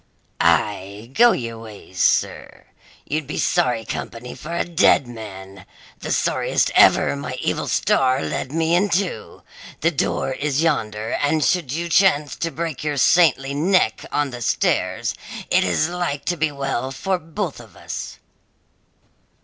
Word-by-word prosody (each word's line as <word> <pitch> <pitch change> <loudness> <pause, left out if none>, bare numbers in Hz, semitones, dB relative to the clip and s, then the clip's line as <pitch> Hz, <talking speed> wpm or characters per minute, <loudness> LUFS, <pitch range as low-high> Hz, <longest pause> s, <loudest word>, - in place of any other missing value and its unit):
"Aye, 100 +6 0
go 240 +6 +6
your 115 - -4
ways, 105 -5 -8
sir; - - 0 0.4
you'd 155 -1 -3
be 150 - -5
sorry 125 -10 +1
company 120 +1 -6
for 165 - -9
a - - 0
dead 170 -6 +3
man 95 -5 -10 0.4
the - - -5
sorriest - - +1
ever 70 - +5
my 70 - -5
evil - - -2
star 130 0 +2
led 130 - -3
me 165 +1 0
into. 190 0 -1 0.4
The 165 - +3
door 140 -3 -1
is 145 +2 -1
yonder, 110 -9 -1
and 145 0 +1
should 170 -6 +1
you 170 +4 -2
chance 155 -6 +3
to 165 - -2
break 160 -1 -4
your 150 -1 -2
saintly 140 -2 +3
neck 155 - +1
on 145 -2 0
the 120 0 -8
stairs, - - 0 0.4
it - - +4
is 155 - +1
like 175 -5 -3
to 175 - 0
be 160 -2 0
well 135 -2 -3
for 185 +7 -2
both 165 - -5
of 110 -7 -15
us." - - -6
140 Hz, 150 wpm, -21 LUFS, 115-165 Hz, 0.4 s, go